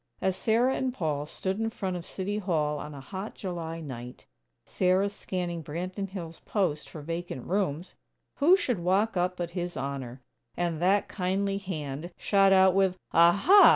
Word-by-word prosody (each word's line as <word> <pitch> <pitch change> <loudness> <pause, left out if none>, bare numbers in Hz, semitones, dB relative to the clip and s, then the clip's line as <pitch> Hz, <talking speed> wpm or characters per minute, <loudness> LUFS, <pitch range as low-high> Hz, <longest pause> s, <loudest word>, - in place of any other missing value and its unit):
As 190 -1 +1
Sarah 235 +6 +2
and 260 -1 0
Paul 150 - -2
stood 190 +4 -3
in 225 0 0
front 190 -5 -3
of 175 -1 -6
City 200 +2 -3
Hall 155 -6 0
on 150 0 -7
a - - -7
hot 190 +8 -6
July 165 -4 -5
night, 125 -4 -8 0.4
Sarah 185 +2 +2
scanning 180 -4 -4
Branton 185 +6 -4
Hills' 170 -4 -7
"Post" 180 -8 -1
for 155 - -8
"vacant 165 -5 -4
rooms," 180 -3 -1 0.4
who 340 +7 +6
should 245 - -1
walk 195 +6 +2
up 180 0 0
but 170 -1 -3
His 175 0 -4
Honor! 135 -2 -5 0.3
And 170 -2 -1
that 195 +3 +3
kindly 195 +1 -1
hand 155 -4 -5
shot 195 -1 +4
out 190 -1 +6
with: 190 -1 +2 0.2
"Aha! 200 - +7
180 Hz, 165 wpm, -28 LUFS, 160-195 Hz, 0.4 s, Aha